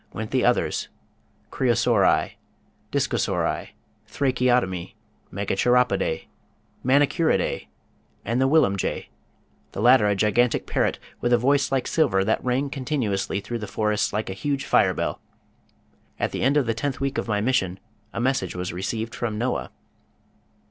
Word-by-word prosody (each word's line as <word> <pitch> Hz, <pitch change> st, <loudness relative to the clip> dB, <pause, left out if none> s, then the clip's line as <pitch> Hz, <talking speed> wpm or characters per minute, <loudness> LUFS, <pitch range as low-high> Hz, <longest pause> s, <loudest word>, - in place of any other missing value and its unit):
went 110 Hz, +2 st, -5 dB
the 130 Hz, -1 st, +1 dB
others, 125 Hz, 0 st, +1 dB, 0.6 s
Creosauri, 120 Hz, -4 st, +2 dB, 0.6 s
Dicosauri, -, -, 0 dB, 0.4 s
Thracheotomi, 125 Hz, -9 st, 0 dB, 0.4 s
Megacheropodæ, 100 Hz, -2 st, +1 dB, 0.6 s
Manicuridæ, 145 Hz, +5 st, +2 dB, 0.6 s
and 115 Hz, +4 st, 0 dB
the 135 Hz, -, +4 dB
Willumjay, 100 Hz, -, +1 dB, 0.6 s
the -, -, -5 dB
latter 120 Hz, -1 st, +5 dB
a 100 Hz, -, +2 dB
gigantic 105 Hz, +4 st, +2 dB
parrot -, -, 0 dB, 0.2 s
with 120 Hz, -, 0 dB
a 120 Hz, -, +6 dB
voice 140 Hz, +4 st, +2 dB
like 135 Hz, -2 st, +1 dB
silver 95 Hz, -, +2 dB
that 110 Hz, +3 st, 0 dB
rang 130 Hz, +3 st, 0 dB
continuously 125 Hz, -9 st, -1 dB
through 120 Hz, +3 st, -5 dB
the 105 Hz, -, -5 dB
forests 105 Hz, +1 st, 0 dB
like 105 Hz, -1 st, -2 dB
a -, -, -3 dB
huge 140 Hz, +7 st, -2 dB
fire -, -, +3 dB
bell. -, -, -3 dB, 1.0 s
At -, -, 0 dB
the -, -, -4 dB
end 135 Hz, +4 st, +3 dB
of 145 Hz, -, +3 dB
the 115 Hz, -, 0 dB
tenth 130 Hz, +4 st, -3 dB
week 135 Hz, 0 st, -1 dB
of -, -, -4 dB
my 105 Hz, -2 st, 0 dB
mission 100 Hz, -5 st, 0 dB, 0.3 s
a -, -, -5 dB
message 125 Hz, -8 st, 0 dB
was 90 Hz, 0 st, -4 dB
received 110 Hz, +5 st, -3 dB
from 110 Hz, -3 st, -3 dB
Noah. 125 Hz, +3 st, -2 dB
120 Hz, 140 wpm, -24 LUFS, 100-130 Hz, 1.0 s, a